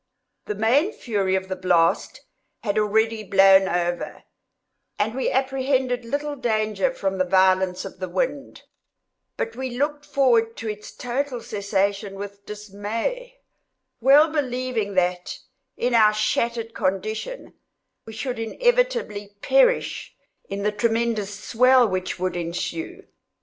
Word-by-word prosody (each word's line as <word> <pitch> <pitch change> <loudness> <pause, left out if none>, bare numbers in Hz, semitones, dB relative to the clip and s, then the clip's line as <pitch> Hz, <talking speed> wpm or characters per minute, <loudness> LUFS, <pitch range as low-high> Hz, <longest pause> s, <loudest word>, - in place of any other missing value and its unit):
The 210 - -2
main 265 - +2
fury 200 -5 -1
of 190 0 -2
the 190 - -3
blast 180 -3 +1 0.4
had 205 -1 0
already 220 +1 +1
blown 195 -1 +6
over, 175 0 -2 0.7
and 220 +2 0
we 260 +1 -1
apprehended 260 -2 0
little 290 +4 -3
danger 220 -1 0
from 195 -6 -3
the - - +4
violence 185 0 +2
of - - -9
the 185 -1 -4
wind; 260 +10 -3 0.7
but 460 - -3
we 255 -2 -5
looked 290 +2 -1
forward 235 -6 +2
to 225 - -6
its 210 -1 -6
total 250 +1 -3
cessation 200 -1 -2
with 200 0 -9
dismay; 220 - -5 0.6
well 285 +6 +6
believing, 255 -8 -2
that, 180 -1 0 0.4
in 245 +1 0
our 215 -2 +6
shattered 230 +1 -1
condition, 215 - -3 0.5
we 220 - -8
should 245 +2 -4
inevitably 475 - 0
perish - - +2 0.3
in 200 0 -4
the 210 - +1
tremendous 225 -1 0
swell 250 +3 +4
which 185 -2 -3
would 185 0 -2
ensue. 170 -1 -4
220 Hz, 125 wpm, -23 LUFS, 195-260 Hz, 0.7 s, blown